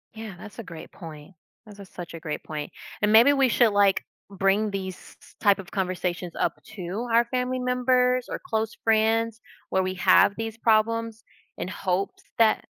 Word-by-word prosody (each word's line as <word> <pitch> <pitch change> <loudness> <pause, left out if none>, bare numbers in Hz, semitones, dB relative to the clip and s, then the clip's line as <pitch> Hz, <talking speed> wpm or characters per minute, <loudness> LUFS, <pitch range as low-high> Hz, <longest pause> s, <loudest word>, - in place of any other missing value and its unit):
Yeah, 220 -4 -7
that's 210 +5 -11
a - - -5
great 165 -4 -10
point. 160 -1 -11 0.3
That 210 - -12
is 200 - -17
a 200 - -9
such 175 -2 -9
a 165 - -7
great 155 -1 -5
point, 150 -1 -6 0.3
and 210 0 +3
maybe 240 +6 +7
we 270 -2 +3
should, 235 -3 +4
like, 200 -1 +3 0.3
bring 195 +2 +1
these 190 -2 -4
s - - -16
s - - -19
type 200 -1 +4
of 190 - -10
conversations 180 -2 -2
up - - +1 0.2
to 195 +6 -4
our 235 +1 +4
family 255 +1 -2
members, 250 0 +2
or - - -4
close 220 -9 -2
friends 225 +1 +2 0.3
where 190 - +2
we 185 0 -3
have 200 +2 +5
these 225 0 -4
problems 225 0 +1 0.3
in - - -4
hopes 185 0 -2
that 225 -1 +3
215 Hz, 190 wpm, -25 LUFS, 185-230 Hz, 0.3 s, maybe